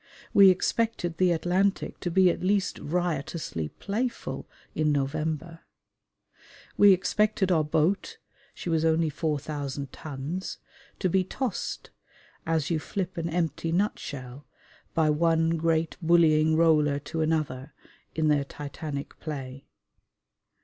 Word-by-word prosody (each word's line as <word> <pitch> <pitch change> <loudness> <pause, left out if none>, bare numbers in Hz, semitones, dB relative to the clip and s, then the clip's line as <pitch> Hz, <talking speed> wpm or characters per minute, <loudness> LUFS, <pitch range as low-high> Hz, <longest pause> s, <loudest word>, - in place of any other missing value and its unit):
We 195 -1 +8
expected 185 -3 0
the 185 -1 +3
Atlantic 180 +4 0
to 175 - -2
be 185 +1 +5
at - - -5
least 195 +1 +1
riotously 155 - -2
playful 235 - -4 0.2
in 155 -1 +1
November. 155 +3 -2 1.2
We 205 -1 +7
expected 195 +1 +2
our 160 -3 +3
boat 160 +6 0 0.4
(she - - -8
was 165 -2 +1
only 160 -1 +2
4,000 145 -2 -3
tons) 155 +5 -5 0.4
to - - 0
be 185 +1 +2
tossed, 240 +3 -4 0.6
as 160 -1 0
you 165 - +1
flip 185 +3 -4
an 170 -1 -2
empty 165 -1 -1
nutshell, 145 -8 -3 0.5
by 155 -2 +3
one 165 +1 +2
great 165 0 0
bullying 160 -2 +4
roller 155 -3 +4
to 160 +3 -4
another, 150 -4 -1 0.4
in 155 -1 +1
their 145 -2 +3
titanic 145 0 -7
play. 135 -3 -7
160 Hz, 120 wpm, -27 LUFS, 150-180 Hz, 1.2 s, We